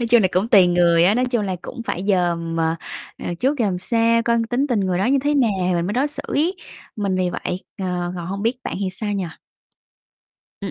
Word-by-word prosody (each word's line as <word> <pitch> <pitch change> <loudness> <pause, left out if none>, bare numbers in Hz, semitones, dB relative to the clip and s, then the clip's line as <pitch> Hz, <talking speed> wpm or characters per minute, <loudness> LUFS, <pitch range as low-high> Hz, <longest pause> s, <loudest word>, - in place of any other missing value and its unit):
nói 235 - 0
chung 240 -1 +6
là 185 - +3
cũng 195 +5 +1
tùy 195 -6 +7
người 175 -1 +4
á, 200 +4 +4
nói 250 +1 +2
chung 245 -4 0
là 190 -2 -2
cũng 235 - -7
phải 180 +3 -3
dòm 170 -3 0
mà, 165 0 +1 0.4
à, - - -5
trước 275 +3 +1
dòm 195 -6 0
sao 230 +3 +2
coi 235 0 +2
tính 265 +4 +1
tình 235 -6 0
người 185 -2 0
đó 195 - +1
như 275 +2 +3
thế 295 0 +2
nào 250 -6 +3 0.2
thì 180 - +1
mình 170 0 0
mới 205 - -2
đối 260 +5 +1
xử 295 - -4
ấy. 340 +6 0 0.4
Mình 200 -3 -1
vì 180 -1 0
vậy, 180 +1 -4 0.2
ờ, 180 -2 -2
còn 170 -1 -5
hông 200 +2 -4
biết 235 +3 +1
bạn - - -3
thì 190 - 0
sao 205 +2 -4
nhỉ? 195 -2 -1 1.4
Ừm, - - -4
200 Hz, 245 wpm, -21 LUFS, 180-235 Hz, 1.4 s, tùy